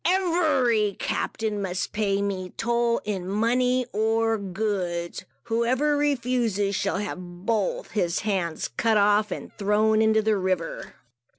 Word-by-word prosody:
Every 310 - +2
captain 215 -2 -2
must 185 -2 -3
pay 200 -2 0
me 185 -2 -3
toll, 235 0 +1
in 190 -3 -3
money 250 +4 +2
or 225 +1 +1
goods. 185 -3 -3 0.2
Whoever 245 +6 +1
refuses, 245 -8 0
shall 200 -1 0
have 180 -3 -6
both - - -1
his 175 -5 0
hands 185 -6 -1
cut 225 -2 +3
off 210 +1 +3
and - - -7
thrown 215 +2 +3
into 220 0 +3
the 215 -1 +2
river. 185 -3 -2
215 Hz, 125 wpm, -25 LUFS, 195-235 Hz, 0.2 s, cut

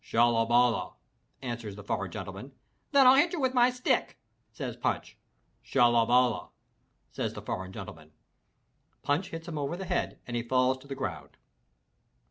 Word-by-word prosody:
"Shallaballah!" 120 +1 +2 0.5
answers 120 -5 -5
the 105 - -10
foreign 100 -1 -2
gentleman. 100 +9 -8 0.4
"Then 280 -2 +6
I'll 255 - +9
hit 295 +6 +4
you 345 - -2
with 260 -2 +1
my 245 -1 +5
stick," 250 0 0 0.3
says - - -5
Punch. - - -2 0.5
"Shallaballah!" 120 -4 +3 0.6
says - - -3
the - - -6
foreign 95 0 -4
gentleman. 95 -7 -10 0.9
Punch 145 +7 0
hits 165 +1 -7
him 155 -3 -4
over 145 +4 -2
the 190 - -5
head - - -2
and 120 - -5
he 120 - 0
falls 130 +2 +1
to 135 - -16
the 135 - -5
ground. 75 - -6
125 Hz, 150 wpm, -29 LUFS, 110-165 Hz, 0.9 s, I'll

